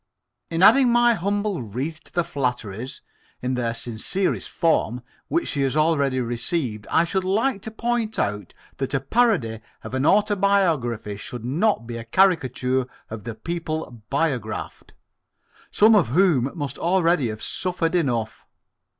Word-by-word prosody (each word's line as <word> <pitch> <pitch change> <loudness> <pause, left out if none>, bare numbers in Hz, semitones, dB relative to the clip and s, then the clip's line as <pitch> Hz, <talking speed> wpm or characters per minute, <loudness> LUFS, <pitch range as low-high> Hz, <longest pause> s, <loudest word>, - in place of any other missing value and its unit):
In 165 +2 0
adding 265 +4 +7
my 240 0 +5
humble 205 - -1
wreath 130 +9 -5
to - - -18
the 175 - +1
flatteries 125 - -4 0.4
in 125 +1 -2
their 120 -2 -1
sincerest 120 - -1
form 125 -8 0 0.2
which 335 +1 0
she 140 - -1
has 135 +2 0
already 140 -4 +2
received, 120 - -2
I 165 - +4
should 185 +3 -1
like 205 +4 0
to 220 - -6
point 230 0 -2
out 105 0 -2 0.2
that 135 +1 -2
a - - +2
parody 140 - +1 0.2
of - - -8
an 130 +3 +1
autobiography 190 - +2
should 120 +3 -7
not 155 - +1
be 120 0 -6
a 115 - -6
caricature 130 -4 +2 0.2
of 110 -2 -7
the 115 - -5
people 155 -2 -5
biographed 130 -7 -3 0.7
some 220 +2 +5
of 210 - +4
whom 140 -2 +3
must 145 -4 -4
already 170 -5 +2
have 110 0 -6
suffered 180 -2 -2
enough. 120 -10 -1
150 Hz, 145 wpm, -23 LUFS, 120-190 Hz, 0.7 s, adding